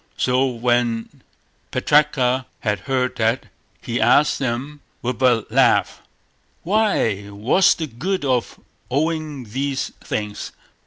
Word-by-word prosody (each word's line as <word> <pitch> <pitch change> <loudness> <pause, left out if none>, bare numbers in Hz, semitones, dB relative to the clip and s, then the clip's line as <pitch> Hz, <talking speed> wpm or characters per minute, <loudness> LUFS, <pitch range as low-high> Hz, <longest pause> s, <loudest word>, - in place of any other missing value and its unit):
So 130 +2 +2
when 120 -2 -1 0.5
Putraka 130 -4 +2
had 105 -5 0
heard 125 +3 -1
that, 115 +3 +1 0.4
he 120 0 -2
asked 135 +6 +4
them 135 +4 -3 0.2
with 125 0 -3
a 120 -4 +3
laugh: - - +3 0.6
"Why, 175 - +1
what's 110 - +3
the 160 - -3
good 155 +7 -3
of 125 -3 -1 0.3
owning 155 0 -1
these 135 +5 -3
things?" 105 -1 -4
125 Hz, 110 wpm, -21 LUFS, 115-145 Hz, 0.6 s, asked